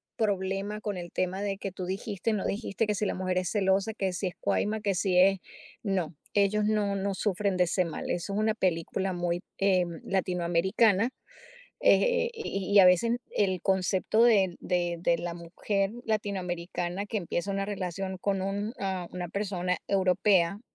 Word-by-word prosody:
problema 200 0 -1
con 205 -2 -3
el 175 -1 -7
tema 185 +2 -1
de 200 -1 -2
que 195 -1 -5
tú 185 0 -6
dijiste, 200 +2 -2
no 205 - -1
dijiste, 210 +1 -1
que 210 - +1
si 210 - -1
la - - -1
mujer 185 -1 -1
es 180 - -2
celosa, 195 +1 +1
que 195 -3 -1
si 185 +2 -2
es 180 - -6
cuaima, 215 +1 0
que 200 -2 +1
si 180 -1 +1
es 195 0 +5 0.4
no, 185 -6 -1 0.2
ellos 205 +1 +3
no 210 -2 +1
no 195 0 -1
sufren 200 -1 0
de 180 - +5
ese 180 +1 +1
mal. 165 - -5
Eso 175 +3 -3
es 205 - 0
una 215 0 +2
película 185 -1 -1
muy, 175 0 -1 0.2
eh, 190 -2 +3 0.2
latinoamericana, 190 +4 +2 0.7
eh, 485 -1 +4
y 200 - -4
y 205 - +8
a 185 - +9
veces 230 +7 +4 0.2
el 190 -4 +1
concepto 190 +3 +2
de 195 -7 +4
de 175 -1 0
de 170 -1 +2
la 175 0 -4
mujer 195 +4 -2
latinoamericana 185 -3 -2
que 215 +2 -3
empieza 185 +1 -2
una 195 0 -1
relación 190 -1 -4
con 195 0 0
un 205 +4 -2
ah, 190 -3 -2
una 180 -1 -4
persona 185 -3 -1
europea 190 -1 +3
195 Hz, 175 wpm, -28 LUFS, 180-205 Hz, 0.7 s, a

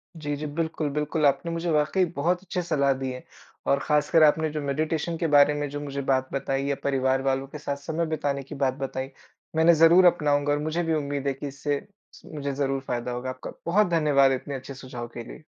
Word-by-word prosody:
जी, 145 -2 -3
जी। 150 - -5
बिल्कुल, 160 0 -2
बिल्कुल 150 +1 -1
आपने 140 +4 +2
मुझे 165 +1 -2
वाक़ई 155 +5 +2
बहुत 175 +5 +1
अच्छे 180 -1 -3
सलाह 140 -5 +2
दी 130 -1 -3
है। 125 - -8 0.4
और 140 - +3
ख़ासकर 150 +1 +3
आपने 155 +1 +4
जो 150 0 -4
मेडिटेशन 155 +4 -1
के 165 - 0
बारे 145 +1 +6
में 145 0 -2
जो 145 - -5
मुझे 140 -1 -4
बात 130 0 +1
बताई 135 0 -1
या 140 0 0
परिवार 135 -1 +1
वालों 135 0 0
के 150 - -8
साथ 140 -2 -3
समय 160 +4 -2
बिताने 140 -2 -1
की 145 - -9
बात 135 -2 +1
बताई 130 0 -3 0.5
मैं 160 - +3
इन्हें 170 +1 +7
ज़रूर 165 +3 +6
अपनाऊँगा 145 -4 +3
और 145 - 0
मुझे 155 +3 -1
भी 165 -1 0
उम्मीद 140 -2 -2
है 140 - +1
कि 140 +2 -6
इससे 140 +1 -2 0.4
मुझे 140 -2 -4
ज़रूर 135 -1 -1
फ़ायदा 125 -2 -3
होगा। 125 +1 -4
आपका 130 0 -7
बहुत 190 +4 +3
धन्यवाद 145 -5 +4
इतने 135 +2 -3
अच्छे 130 +1 -7
सुझाव 125 -2 -7
के 120 - -5
लिए। 155 - -12
145 Hz, 220 wpm, -26 LUFS, 135-155 Hz, 0.5 s, इन्हें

